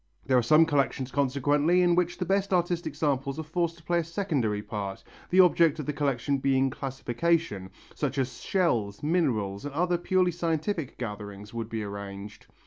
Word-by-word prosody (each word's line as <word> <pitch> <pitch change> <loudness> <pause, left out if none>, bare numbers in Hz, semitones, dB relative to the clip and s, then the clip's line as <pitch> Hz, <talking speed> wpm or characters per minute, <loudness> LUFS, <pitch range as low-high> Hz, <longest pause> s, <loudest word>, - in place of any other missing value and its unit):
There 130 - +2
are 125 - +5
some 155 +7 +5
collections 135 -3 0
consequently 145 +5 +2
in 175 -1 +4
which 175 0 +1
the 180 - -2
best 195 +2 0
artistic 175 -4 0
samples 140 -2 -1
are 160 - -3
forced 170 +1 -2
to 170 - -18
play 175 +2 +1
a - - 0
secondary 150 - -1
part, 100 -3 -5 0.3
the 185 +1 +6
object 170 -3 +4
of 150 - -5
the 150 - -2
collection 140 -1 0
being 135 0 +2
classification, 135 - -1 0.3
just 140 -2 -2
as 130 -2 -2
shells, 120 - 0
minerals 120 - 0
and 145 -1 -6
other 175 +1 +1
purely 185 0 +2
scientific 165 -2 -2
gatherings 105 -2 -7
would 115 -1 -4
be 110 -2 -3
arranged. 100 0 -8
145 Hz, 175 wpm, -28 LUFS, 120-170 Hz, 0.3 s, the